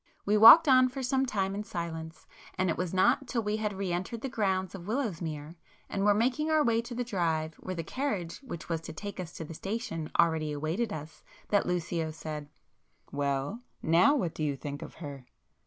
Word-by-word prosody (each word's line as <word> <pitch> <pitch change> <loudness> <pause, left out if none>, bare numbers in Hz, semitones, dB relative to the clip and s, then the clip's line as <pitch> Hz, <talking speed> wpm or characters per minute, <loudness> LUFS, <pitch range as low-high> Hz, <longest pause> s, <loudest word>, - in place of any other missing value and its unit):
We 205 - +3
walked 230 +10 +10
on 255 -1 +6
for 265 +1 -5
some 265 +1 +1
time 195 -4 -1
in 205 +1 -3
silence, 170 -5 -6 0.3
and 185 -1 +2
it - - -1
was 180 -1 -2
not 240 +8 +3
till 235 -2 -1
we 210 +1 -1
had 215 -1 -1
re 190 -2 -2
entered 185 +6 -3
the 270 - -3
grounds 190 -6 0
of 185 -2 -9
Willowsmere, 170 - -3 0.3
and 195 - -1
were 205 0 +5
making 255 +8 +1
our 310 -1 +4
way 230 -3 +2
to 235 +1 -8
the 245 - -1
drive 165 -8 -1
where 185 - -5
the 165 - -3
carriage 200 - -3
which 230 - -8
was 165 -2 -2
to 160 - -8
take 200 +5 -7
us 175 -2 -5
to 165 - -6
the 165 - -8
station 165 -4 -4
already 160 -2 +2
awaited 165 +10 -2
us, 155 0 -7 0.3
that 205 - +2
Lucio 170 -2 -1
said— 155 -2 -6 0.6
"Well; 140 - -1 0.2
now, 175 - +5
what 180 - -1
do 155 - -4
you 145 -2 0
think 145 +1 -6
of - - -9
her?" 140 -5 -8
185 Hz, 205 wpm, -30 LUFS, 160-230 Hz, 0.6 s, walked